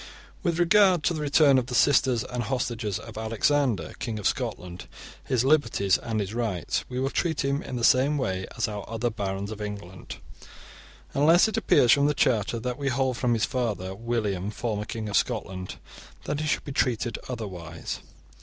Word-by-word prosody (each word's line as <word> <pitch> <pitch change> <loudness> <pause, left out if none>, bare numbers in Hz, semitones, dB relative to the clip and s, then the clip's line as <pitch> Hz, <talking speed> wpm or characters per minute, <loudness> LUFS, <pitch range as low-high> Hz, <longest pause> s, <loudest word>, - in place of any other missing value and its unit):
* - - -25
With 170 -4 0
regard 180 -1 +4
to 170 - +2
the 155 - -4
return 145 -2 +5
of 125 - -4
the 125 - -3
sisters 130 -3 +4
and 125 -1 -4
hostages 115 -4 -2
of - - -9
Alexander, 115 - 0
king 115 -3 -3
of 105 - -7
Scotland, 90 0 -3 0.4
his 130 -2 +1
liberties 135 - +3
and 110 -2 -3
his 100 0 -3
rights, 110 -8 -1
we 125 0 -3
will 135 +1 0
treat 160 -5 0
him 140 +1 0
in 130 - -6
the 120 - -3
same 135 +5 +4
way 95 -8 -2
as - - +1
our 105 -2 -5
other 115 +1 -1
barons 100 -1 -3
of 110 -1 -7
England, 100 -3 -7 1.0
unless 165 +8 +5
it 220 - -2
appears 120 - +4
from 140 0 +5
the 150 - +1
charters 115 -2 +1
that 125 +1 -3
we 140 - -2
hold 130 0 0
from 120 0 +1
his 110 - +1
father 110 -8 -2
William, 105 -3 -2
formerly 105 -1 -3
king 110 -1 -4
of 105 - -3
Scotland, 95 -6 -2 0.5
that 150 - -2
he 155 - -2
should - - 0
be 145 - -7
treated 120 -3 0
otherwise. 90 -9 -6
120 Hz, 190 wpm, -26 LUFS, 105-140 Hz, 1.0 s, return